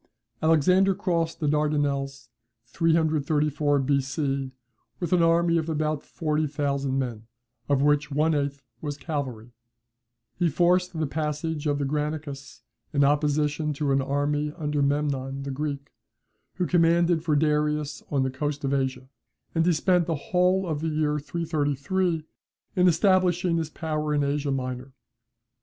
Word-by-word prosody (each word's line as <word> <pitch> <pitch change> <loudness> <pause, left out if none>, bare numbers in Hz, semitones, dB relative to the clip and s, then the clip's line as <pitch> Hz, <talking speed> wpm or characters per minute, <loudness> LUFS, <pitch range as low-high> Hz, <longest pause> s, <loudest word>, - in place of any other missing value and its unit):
"Alexander 180 +5 +4
crossed 170 -4 -1
the 155 - -1
Dardanelles 145 -3 0 0.4
334 150 -1 +1
B.C. 135 0 -1 0.5
with 175 0 -1
an 180 - +4
army 170 0 +3
of 160 0 -3
about 155 -1 -1
forty 155 -2 -1
thousand 140 -2 -1
men, 115 -4 -3 0.4
of 140 -1 +3
which 145 0 +2
one 155 +3 +2
eighth 140 -1 -2 0.2
was 145 -2 -4
cavalry; 130 -8 -5 0.9
he 175 -2 +3
forced 175 +3 +2
the 155 - +1
passage 150 +1 -2
of 145 -1 +1
the 140 - -1
Granicus 150 -1 -4 0.3
in 145 -2 +2
opposition 150 +1 +1
to 140 0 -1
an 135 0 +3
army 145 +2 0
under 150 -3 -1
Memnon, 140 -1 -1
the 140 - -4
Greek, 140 0 -4 0.6
who 180 - 0
commanded 170 -1 +3
for 155 -3 +1
Darius 150 0 0
on 140 -2 +1
the 130 - -1
coast 145 +2 -3
of 135 0 0
Asia, 130 -1 -1 0.5
and 165 - +2
he - - +5
spent 175 +1 +2
the 165 - 0
whole 180 +5 +1
of 155 -4 -2
the 160 - -1
year 150 -1 0
333 160 +2 -1 0.5
in 180 0 +4
establishing 180 -1 +3
his 160 -2 -2
power 155 -2 -2
in 145 - +2
Asia 140 0 -1
Minor. 130 -1 -3
150 Hz, 145 wpm, -26 LUFS, 140-165 Hz, 0.9 s, he